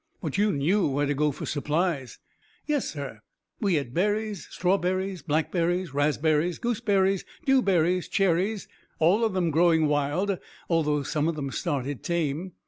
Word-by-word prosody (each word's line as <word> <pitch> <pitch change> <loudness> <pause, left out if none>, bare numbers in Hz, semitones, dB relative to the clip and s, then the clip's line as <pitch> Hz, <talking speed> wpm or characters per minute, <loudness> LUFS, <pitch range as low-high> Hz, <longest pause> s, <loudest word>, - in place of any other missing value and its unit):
"But 155 -6 -4
you 205 +1 +3
knew 170 +8 +2
where 145 +1 0
to 145 - 0
go 150 +1 +1
for - - -6
supplies." 150 -2 -1 0.5
"Yes, 295 -3 0
sir; 140 -7 -6 0.4
we 200 -6 +1
had 140 -5 -2
berries, 210 +2 -1
strawberries, 185 0 0
blackberries, 170 +2 0
raspberries, 150 +3 +1
gooseberries, 205 -5 +1 0.2
dewberries, 185 - +3
cherries, 195 +2 +1 0.3
all 180 +8 +3
of 220 -3 +1
them 175 -3 +1
growing 165 0 +4
wild 150 +7 0 0.3
although 150 -4 +1
some 150 +2 -1
of 165 - -1
them 140 -3 -4
started 140 -5 -2
tame. 170 +1 -2
170 Hz, 140 wpm, -26 LUFS, 150-195 Hz, 0.5 s, growing